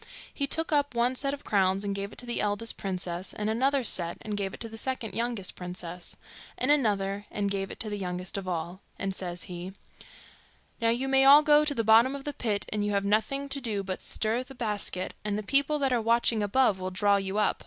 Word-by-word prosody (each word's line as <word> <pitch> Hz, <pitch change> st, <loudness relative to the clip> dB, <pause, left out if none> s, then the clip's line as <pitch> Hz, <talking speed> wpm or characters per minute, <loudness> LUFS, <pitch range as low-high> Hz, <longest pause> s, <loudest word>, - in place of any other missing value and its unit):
He 280 Hz, -, -1 dB
took 325 Hz, +3 st, -2 dB
up 285 Hz, -3 st, +2 dB
one 240 Hz, +2 st, +2 dB
set 275 Hz, +2 st, -1 dB
of 285 Hz, 0 st, -6 dB
crowns, 195 Hz, -1 st, +2 dB
and 200 Hz, -1 st, -1 dB
gave 200 Hz, +1 st, -4 dB
it -, -, -13 dB
to 245 Hz, -, -5 dB
the 240 Hz, -, -1 dB
eldest 210 Hz, +2 st, -1 dB
princess; 180 Hz, -1 st, -4 dB
and 210 Hz, +1 st, -1 dB
another 265 Hz, +4 st, +2 dB
set, 175 Hz, -6 st, +1 dB
and 210 Hz, -1 st, -3 dB
gave 195 Hz, -1 st, -2 dB
it -, -, -10 dB
to 230 Hz, -, -1 dB
the 225 Hz, -, -10 dB
second 235 Hz, -1 st, -3 dB
youngest 230 Hz, -5 st, -2 dB
princess; 180 Hz, -1 st, -6 dB, 0.4 s
and 255 Hz, +3 st, +2 dB
another, 205 Hz, -7 st, +1 dB
and 200 Hz, -1 st, -2 dB
gave 195 Hz, -1 st, -2 dB
it -, -, -9 dB
to 225 Hz, -, -2 dB
the 205 Hz, -, -3 dB
youngest 180 Hz, 0 st, -4 dB
of 195 Hz, -2 st, -4 dB
all; 175 Hz, +2 st, -3 dB, 0.2 s
and 195 Hz, 0 st, -2 dB
says 175 Hz, -2 st, -5 dB
he, 180 Hz, +1 st, -7 dB, 1.1 s
'Now 230 Hz, -, +3 dB
you 245 Hz, +3 st, 0 dB
may 270 Hz, 0 st, +4 dB
all 285 Hz, +2 st, +9 dB
go 300 Hz, 0 st, +6 dB
to 295 Hz, -1 st, 0 dB
the 230 Hz, -, 0 dB
bottom 230 Hz, +5 st, +5 dB
of 275 Hz, -, -7 dB
the 290 Hz, -, -3 dB
pit, 215 Hz, -7 st, -1 dB
and 210 Hz, -1 st, -1 dB
you 205 Hz, 0 st, 0 dB
have 200 Hz, 0 st, +1 dB
nothing 220 Hz, +7 st, +1 dB
to 275 Hz, 0 st, 0 dB
do 210 Hz, -5 st, -2 dB
but 185 Hz, -1 st, -4 dB
stir 225 Hz, +3 st, 0 dB
the 260 Hz, +1 st, -11 dB
basket, 210 Hz, -5 st, -2 dB
and 210 Hz, -1 st, -1 dB
the 215 Hz, -, -3 dB
people 280 Hz, +6 st, +2 dB
that 270 Hz, -3 st, +1 dB
are 240 Hz, -, +2 dB
watching 230 Hz, 0 st, +2 dB
above 205 Hz, -1 st, +3 dB
will 185 Hz, 0 st, -3 dB
draw 200 Hz, +2 st, +3 dB
you 195 Hz, +1 st, -3 dB
up. 215 Hz, -, +2 dB
210 Hz, 240 wpm, -28 LUFS, 195-255 Hz, 1.1 s, all